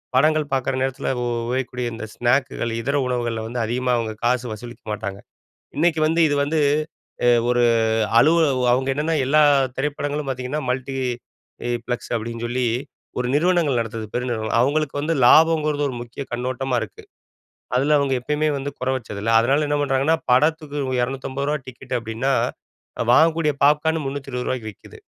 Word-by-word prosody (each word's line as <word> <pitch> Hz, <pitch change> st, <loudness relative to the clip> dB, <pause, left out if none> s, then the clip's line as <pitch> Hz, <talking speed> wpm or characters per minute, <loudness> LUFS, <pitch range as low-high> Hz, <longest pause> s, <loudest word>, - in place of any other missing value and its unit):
படங்கள் 155 Hz, +2 st, +3 dB
பார்க்குற 135 Hz, 0 st, 0 dB
நேரத்தில 130 Hz, 0 st, -1 dB
உ -, -, -1 dB, 0.2 s
உபயோகிக்கக்கூடிய 125 Hz, 0 st, -2 dB
இந்த 115 Hz, 0 st, -6 dB
ஸ்நாக்குகள், 120 Hz, -1 st, 0 dB
இதர 140 Hz, +5 st, 0 dB
உணவுகள்ல 120 Hz, -3 st, -2 dB
வந்து 120 Hz, +2 st, -4 dB
அதிகமா 125 Hz, +3 st, -1 dB
அவங்க 115 Hz, -2 st, -2 dB
காசு 125 Hz, +1 st, +1 dB
வசூலிக்க 120 Hz, +3 st, -10 dB
மாட்டாங்க. 100 Hz, -1 st, -5 dB, 0.6 s
இன்னைக்கு 160 Hz, +1 st, +2 dB
வந்து 165 Hz, +2 st, +1 dB
இது 145 Hz, -, +1 dB
வந்து 155 Hz, +2 st, 0 dB, 0.7 s
அ -, -, +5 dB, 0.2 s
ஒரு 120 Hz, 0 st, +3 dB, 0.6 s
அலுவல 160 Hz, +4 st, +4 dB
ஓ -, -, 0 dB
அவங்க 130 Hz, +2 st, 0 dB
என்னன்னா, 155 Hz, +3 st, 0 dB
எல்லா 150 Hz, +4 st, +4 dB, 0.4 s
திரைப்படங்களும் 145 Hz, +1 st, -2 dB
பார்த்தீங்கன்னா, 130 Hz, +3 st, -3 dB
மல்டி 130 Hz, +1 st, -3 dB, 0.7 s
இ -, -, -2 dB, 0.2 s
ப்ளக்ஸ் 120 Hz, -1 st, -4 dB
அப்டின்னு 115 Hz, +1 st, -4 dB
சொல்லி 125 Hz, +1 st, 0 dB, 0.5 s
ஒரு 125 Hz, -, -1 dB
நிறுவனங்கள் 165 Hz, -5 st, +2 dB
நடத்துறது, 115 Hz, -1 st, -4 dB
பெரு 125 Hz, +1 st, -1 dB
நிறுவனம். 110 Hz, -1 st, -1 dB
அவங்களுக்கு 145 Hz, +2 st, 0 dB
வந்து 160 Hz, +3 st, 0 dB
லாபங்கிறது 155 Hz, 0 st, +4 dB
ஒரு 130 Hz, -, -5 dB
முக்கிய 120 Hz, +3 st, -7 dB
கண்ணோட்டமா 125 Hz, +1 st, -2 dB
இருக்கு. 110 Hz, -, -8 dB, 0.7 s
அதில 140 Hz, +4 st, +3 dB
அவங்க 140 Hz, -1 st, 0 dB
எப்பயுமே 150 Hz, +4 st, 0 dB
வந்து 140 Hz, +1 st, -4 dB
குறை 130 Hz, +1 st, 0 dB
வச்சது 105 Hz, -4 st, -8 dB
இல்ல. 115 Hz, +2 st, 0 dB
அதனால 140 Hz, +6 st, +2 dB
என்ன 145 Hz, 0 st, +1 dB
பண்ணுறாங்கன்னா, 140 Hz, +3 st, +2 dB
படத்துக்கு 150 Hz, +3 st, +2 dB
இவுங்க 130 Hz, -2 st, -1 dB
ரூ.250 135 Hz, +2 st, -3 dB
டிக்கெட் 130 Hz, 0 st, -5 dB
அப்படின்னா, 115 Hz, +4 st, -2 dB, 0.7 s
அ -, -, -1 dB
வாங்கக்கூடிய 160 Hz, 0 st, +4 dB
பாப்கார்ன் 150 Hz, +2 st, +2 dB
ரூ.320க்கு 130 Hz, -4 st, -4 dB
விக்கிது. -, -, -16 dB
130 Hz, 155 wpm, -22 LUFS, 120-150 Hz, 0.7 s, அ